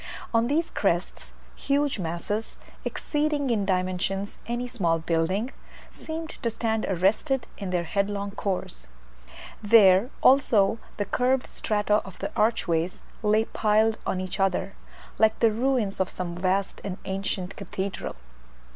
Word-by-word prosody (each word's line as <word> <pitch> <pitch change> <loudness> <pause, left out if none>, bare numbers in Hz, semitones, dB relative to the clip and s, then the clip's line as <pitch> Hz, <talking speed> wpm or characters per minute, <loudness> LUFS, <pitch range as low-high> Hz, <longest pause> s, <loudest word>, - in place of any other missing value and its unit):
On 230 +1 +3
these 320 +5 0
crests - - -1 0.2
huge 285 -3 0
masses, 180 +6 -3 0.3
exceeding 295 -3 -1
in 210 -4 +1
dimensions 185 +1 -1
any 240 +1 -2
small 175 -9 +1
building, 170 +8 0 0.4
seemed 320 0 -6
to 235 - +1
stand 225 -1 -1
arrested 210 - +1
in 195 -3 -4
their 180 -1 0
headlong 200 +3 -1
course: 185 - -4 0.7
there, 205 0 +6
also, 225 -5 +4 0.2
the 205 - -1
curved 250 +5 +1
strata 210 -1 +1
of 190 - -11
the - - -4
archways 180 -6 +1 0.2
lay 215 0 +3
piled 220 +1 +2
on 185 - 0
each 185 +1 -4
other, 195 0 +1 0.5
like 220 0 +4
the 230 -1 +5
ruins 235 -3 0
of 190 - +1
some 180 -2 -4
vast 185 +2 -1
and 190 -2 -4
ancient 190 -1 -3
cathedral. 195 0 -4
205 Hz, 130 wpm, -26 LUFS, 185-230 Hz, 0.7 s, there